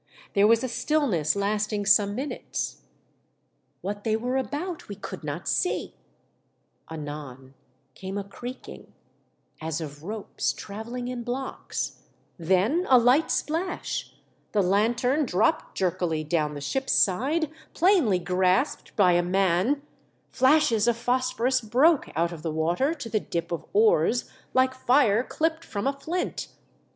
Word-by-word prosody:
There 205 Hz, 0 st, +5 dB
was 230 Hz, +2 st, +4 dB
a -, -, 0 dB
still 270 Hz, +6 st, 0 dB
ness 165 Hz, -, +1 dB
lasting 205 Hz, +1 st, -1 dB
some 200 Hz, 0 st, +4 dB
minutes. 275 Hz, +5 st, -4 dB, 1.0 s
What 205 Hz, +2 st, -4 dB
they 220 Hz, -1 st, +1 dB
were 245 Hz, +3 st, -2 dB
about 295 Hz, -, -3 dB
we 200 Hz, -, -5 dB
could 190 Hz, -3 st, -8 dB
not 150 Hz, +1 st, -5 dB
see; 145 Hz, 0 st, 0 dB, 1.0 s
anon 145 Hz, -4 st, -8 dB, 0.4 s
came 190 Hz, +1 st, -6 dB
a 200 Hz, -, -2 dB
creak 245 Hz, +6 st, -9 dB
ing, -, -, -12 dB, 0.7 s
as 160 Hz, 0 st, -2 dB
of 145 Hz, -2 st, -7 dB
ropes 210 Hz, +3 st, -3 dB
travelling 235 Hz, +4 st, -6 dB
in 250 Hz, -1 st, -4 dB
blocks, 250 Hz, +3 st, -4 dB, 0.4 s
then 190 Hz, -, +2 dB
a 260 Hz, -, +8 dB
light 250 Hz, +6 st, +4 dB
splash; 335 Hz, +4 st, -2 dB, 0.4 s
the 205 Hz, -2 st, +3 dB
lanthorn 235 Hz, +9 st, +2 dB
dropped 220 Hz, -, +1 dB
jerkily 175 Hz, -4 st, 0 dB
down 150 Hz, -1 st, 0 dB
the 145 Hz, -, -6 dB
ship's 265 Hz, -, -1 dB
side, 285 Hz, -, +2 dB, 0.2 s
plainly 335 Hz, -, +4 dB
grasped 180 Hz, -, 0 dB
by 190 Hz, -4 st, +5 dB
a 175 Hz, 0 st, +4 dB
man; 190 Hz, +9 st, +1 dB, 0.5 s
flashes 260 Hz, -5 st, +3 dB
of 235 Hz, -1 st, +2 dB
phosphorus 255 Hz, +1 st, +1 dB
broke 260 Hz, +8 st, +3 dB
out 170 Hz, +1 st, +1 dB
of 165 Hz, -3 st, -8 dB
the 160 Hz, -, -3 dB
water 175 Hz, -, 0 dB
to 290 Hz, -7 st, -7 dB
the 215 Hz, -1 st, 0 dB
dip 170 Hz, -4 st, -4 dB
of 170 Hz, -, -4 dB
oars, 430 Hz, -, +3 dB, 0.3 s
like 260 Hz, 0 st, +4 dB
fire 250 Hz, -4 st, +3 dB
clipped 325 Hz, +3 st, -1 dB
from 200 Hz, -7 st, -4 dB
a 275 Hz, -, +2 dB
flint. 325 Hz, +6 st, -3 dB
220 Hz, 140 wpm, -26 LUFS, 180-265 Hz, 1.0 s, a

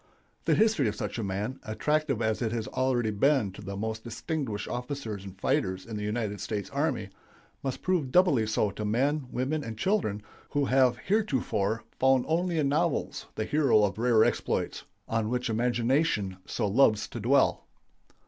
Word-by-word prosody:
The -, -, +4 dB
history 215 Hz, -, +3 dB
of 105 Hz, -, -1 dB
such -, -, -4 dB
a -, -, -2 dB
man, 105 Hz, +6 st, -3 dB
attractive 135 Hz, +3 st, 0 dB
as 110 Hz, +1 st, 0 dB
it 115 Hz, -2 st, 0 dB
has 115 Hz, -2 st, -2 dB
already 125 Hz, -4 st, 0 dB
been 130 Hz, -1 st, +2 dB
to 95 Hz, -, -11 dB
the 100 Hz, 0 st, -6 dB
most 110 Hz, +1 st, -3 dB
distinguished 120 Hz, -2 st, -3 dB
officers 125 Hz, -5 st, -4 dB
and 95 Hz, -1 st, -10 dB
fighters 95 Hz, -1 st, 0 dB
in 115 Hz, -, -6 dB
the 105 Hz, -, -4 dB
United 105 Hz, -2 st, -2 dB
States 100 Hz, 0 st, -4 dB
Army, 140 Hz, -7 st, -1 dB, 0.5 s
must 135 Hz, -2 st, -4 dB
prove 175 Hz, -8 st, 0 dB
doubly 145 Hz, -11 st, +4 dB
so 105 Hz, -1 st, +1 dB
to 105 Hz, -, -6 dB
men, 130 Hz, +6 st, 0 dB
women, 140 Hz, +5 st, -1 dB
and 115 Hz, -4 st, -6 dB
children 110 Hz, -, 0 dB, 0.3 s
who 145 Hz, -1 st, +1 dB
have 130 Hz, -2 st, +3 dB
heretofore 115 Hz, -, 0 dB, 0.2 s
found 130 Hz, -1 st, +4 dB
only 170 Hz, +1 st, 0 dB
in 150 Hz, -3 st, +2 dB
novels 145 Hz, +3 st, 0 dB
the 110 Hz, -, -2 dB
hero 140 Hz, -8 st, +3 dB
of 100 Hz, 0 st, 0 dB
rare 115 Hz, -2 st, +5 dB
exploits, -, -, -1 dB, 0.2 s
on 115 Hz, -1 st, 0 dB
which 125 Hz, -1 st, -1 dB
imagination 120 Hz, -, +1 dB
so 110 Hz, -, -1 dB
loves 110 Hz, 0 st, +3 dB
to 120 Hz, -, -6 dB
dwell. 130 Hz, +6 st, +2 dB
120 Hz, 170 wpm, -28 LUFS, 105-140 Hz, 0.5 s, rare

